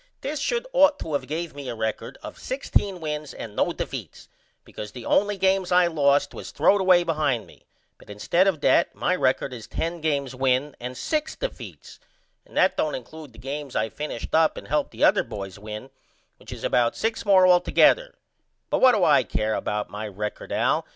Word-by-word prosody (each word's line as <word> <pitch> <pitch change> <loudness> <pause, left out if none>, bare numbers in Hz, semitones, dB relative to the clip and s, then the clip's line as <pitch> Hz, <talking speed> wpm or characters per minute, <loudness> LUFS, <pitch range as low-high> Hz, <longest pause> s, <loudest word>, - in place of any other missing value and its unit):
This 290 +2 -3
should 470 - -1
ought 290 -11 +5
to 160 - -5
of 145 - -2
gave 165 +3 -4
me 140 -2 -7
a - - -4
record 110 -1 -4
of - - -9
16 205 - -1
wins 150 -2 -4
and 105 -2 -8
0 - - +1
defeats - - -7 0.4
because 105 0 -8
the 125 - -9
only 205 0 +2
games 190 -1 +1
I 180 0 +5
lost 145 -4 +2
was - - -8
throwed 200 0 +3
away 185 -2 +5
behind 150 -9 0
me - - -20 0.3
but - - -18
instead 170 - +1
of 170 -7 0
that 170 - +3
my 180 - 0
record 135 -3 0
is 115 -3 -9
10 165 0 -3
games 140 -4 -1
win 130 +2 0
and 125 +1 -6
6 310 0 -2
defeats - - -8 0.5
and - - -11
that - - +4
don't 155 - 0
include 150 +3 -10
the 115 - -18
games 140 +2 -6
I 110 +1 0
finished 150 -4 -6
up 160 0 +3
and - - -8
helped 150 +1 0
the - - -4
other - - +5
boys 95 -1 -8
win 105 +5 -8 0.5
which - - -13
is - - -8
about 120 -1 +2
6 225 0 -1
more 195 -3 +5
altogether 185 - +4 0.6
but - - +1
what 255 -2 +7
do 205 - +1
I 155 -3 +5
care 110 0 -2
about 105 0 -3
my 105 +1 -5
record 105 +1 -6
Al? - - +1
150 Hz, 200 wpm, -24 LUFS, 125-185 Hz, 0.6 s, what